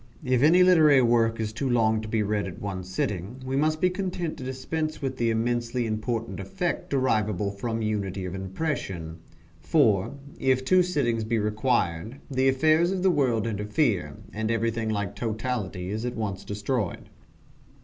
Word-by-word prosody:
If 125 -1 +2
any 170 +5 +6
literary 155 -7 +6
work 115 -1 +3
is 110 -1 -2
too 130 +4 -2
long 110 -2 +2
to 110 - -7
be 110 0 0
read 105 -1 -1
at 90 - -8
one 95 -2 -4
sitting, 95 +5 -3
we 130 +1 -2
must 155 +2 +1
be 180 +2 +3
content 180 -3 -3
to - - -7
dispense 155 +5 -3
with 135 -2 -3
the 115 -1 +1
immensely 120 +1 0
important 115 +1 -3
effect 185 -3 -3
derivable 105 -7 +1
from 115 +3 -3
unity 100 -3 -2
of 90 - -5
impression 95 - -4 0.4
for, 110 - +2 0.2
if 130 0 +2
two 185 +6 +5
sittings 135 -11 0
be 115 +1 0
required, 105 0 0
the 130 0 +3
affairs 155 +5 +3
of 190 -1 -2
the 190 - +5
world 125 -8 +1
interfere, 105 - 0 0.2
and 110 +1 -2
everything 115 0 0
like 100 -2 -2
totality 110 -5 -3
is 110 +2 -3
at 125 0 -3
once 100 -4 -3
destroyed. 105 0 -3
115 Hz, 165 wpm, -26 LUFS, 105-135 Hz, 0.4 s, any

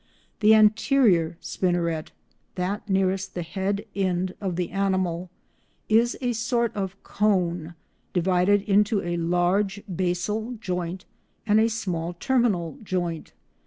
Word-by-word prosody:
The 220 0 +6
anterior 210 - +4
spinneret 170 -3 -1 0.5
(that 195 +4 -3
nearest 190 0 0
the 175 - -2
head 200 +4 -2
end 185 -1 0
of 190 -3 -2
the 180 0 -2
animal) 185 -2 -1 0.6
is 230 +3 +3
a 245 -1 0
sort 235 0 0
of 195 -2 -3
cone, 175 -5 0 0.4
divided 185 +3 +2
into 210 +1 +2
a 175 0 -2
large 180 +4 +1
basal 190 +6 -1
joint 180 -3 -4 0.4
and 215 0 +4
a 225 +1 +3
small 180 -7 -3
terminal 235 - 0
joint. 175 -5 -3
190 Hz, 120 wpm, -25 LUFS, 175-210 Hz, 0.6 s, The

